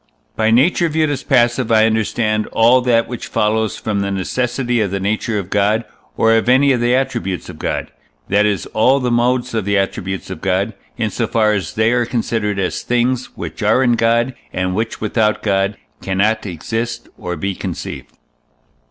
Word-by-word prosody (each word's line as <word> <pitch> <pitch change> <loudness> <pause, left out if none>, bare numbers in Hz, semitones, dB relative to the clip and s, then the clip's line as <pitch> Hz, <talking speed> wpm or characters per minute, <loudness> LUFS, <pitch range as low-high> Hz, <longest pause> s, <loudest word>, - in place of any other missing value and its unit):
By 110 0 +2
nature 160 +9 +3
viewed 155 -1 +1
as 145 - -2
passive 120 -2 +2
I 110 -1 +5
understand 110 -1 0
all 120 +3 +4
that 120 -2 +2
which 120 - -6
follows 110 -1 0
from 105 -2 -2
the 100 0 -1
necessity 120 +5 -1
of 105 - 0
the 100 +1 -2
nature 110 +3 -1
of 95 -2 -5
God, 105 +3 +2 0.3
or 115 0 +4
of 115 +1 +1
any 135 +2 +5
of 125 -3 +1
the 120 +1 +3
attributes 120 -8 -2
of - - -10
God, - - -3 0.4
that 100 +2 +3
is, 105 -3 0
all 130 +5 +4
the 125 -2 -1
modes 125 +1 +1
of 110 -2 0
the 100 +1 +1
attributes 95 -1 -3
of 95 - -7
God, 100 +3 0 0.2
in 110 -3 -1
so 115 - -1
far 110 -1 +2
as 90 -7 -3
they 110 +1 +3
are 120 -1 +1
considered 110 -4 -1
as 95 -2 -1
things 125 +1 0
which - - -6
are 130 - +3
in 120 - +3
God, 115 +2 +2 0.2
and 90 0 -1
which 110 +3 -3
without 110 0 0
God 100 -1 0 0.2
cannot 105 +3 0
exist 115 +7 -4
or 90 -3 -5
be 95 +4 -2
conceived. - - -7
110 Hz, 185 wpm, -18 LUFS, 100-120 Hz, 0.4 s, I